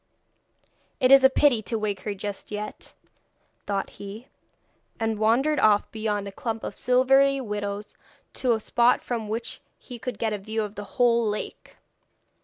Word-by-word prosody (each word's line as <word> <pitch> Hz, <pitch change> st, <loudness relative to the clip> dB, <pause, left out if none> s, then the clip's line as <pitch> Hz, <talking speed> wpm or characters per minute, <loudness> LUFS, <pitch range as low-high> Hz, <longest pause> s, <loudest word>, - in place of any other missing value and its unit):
'It 255 Hz, -1 st, +4 dB
is 275 Hz, -1 st, +8 dB
a 265 Hz, -, +8 dB
pity 265 Hz, -4 st, +3 dB
to 225 Hz, +2 st, -2 dB
wake 210 Hz, -3 st, -2 dB
her 205 Hz, +1 st, -4 dB
just 200 Hz, 0 st, -6 dB
yet,' 210 Hz, 0 st, -7 dB, 0.7 s
thought 200 Hz, -1 st, -2 dB
he, 205 Hz, +5 st, -9 dB, 0.7 s
and 225 Hz, -1 st, -1 dB
wandered 255 Hz, +8 st, +2 dB
off 210 Hz, -1 st, +3 dB
beyond 210 Hz, -2 st, -2 dB
a -, -, -6 dB
clump 225 Hz, +2 st, -4 dB
of -, -, -5 dB
silvery 270 Hz, +2 st, +4 dB
willows 205 Hz, -3 st, -4 dB, 0.4 s
to 250 Hz, -2 st, +1 dB
a 220 Hz, -, 0 dB
spot 240 Hz, +3 st, +2 dB
from 225 Hz, -4 st, -3 dB
which 230 Hz, +2 st, -4 dB, 0.2 s
he 245 Hz, -3 st, -10 dB
could 245 Hz, -2 st, -5 dB
get 220 Hz, 0 st, -1 dB
a 210 Hz, -, -3 dB
view 220 Hz, +2 st, -3 dB
of 205 Hz, -1 st, -6 dB
the 205 Hz, -, -7 dB
whole 235 Hz, -1 st, +4 dB
lake. 210 Hz, -, -6 dB
220 Hz, 165 wpm, -25 LUFS, 210-245 Hz, 0.7 s, is